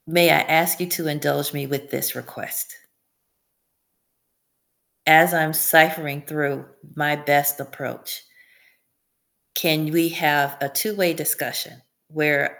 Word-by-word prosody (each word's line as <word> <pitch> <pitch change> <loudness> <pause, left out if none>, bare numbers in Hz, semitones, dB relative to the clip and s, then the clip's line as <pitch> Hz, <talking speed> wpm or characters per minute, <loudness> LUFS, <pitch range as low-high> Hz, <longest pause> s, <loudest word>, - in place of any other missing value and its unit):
May 170 0 +5
I - - +5
ask 165 +1 +2
you 180 - -4
to 175 -2 -3
indulge 145 -1 -2
me 140 -1 -6
with 140 0 -6
this - - -2
request? 470 - -8 2.3
As 160 +2 +7
I'm 160 -1 +1
ciphering 160 -2 +3
through 145 -1 -4 0.3
my 150 -1 0
best 145 -1 +1
approach 140 0 -9 1.3
can 155 -3 0
we 165 0 +2
have 145 -4 +1
a 140 - -3
two-way 180 +4 -1
discussion 155 -2 -4 0.3
where 150 -2 0
155 Hz, 115 wpm, -21 LUFS, 145-165 Hz, 2.3 s, As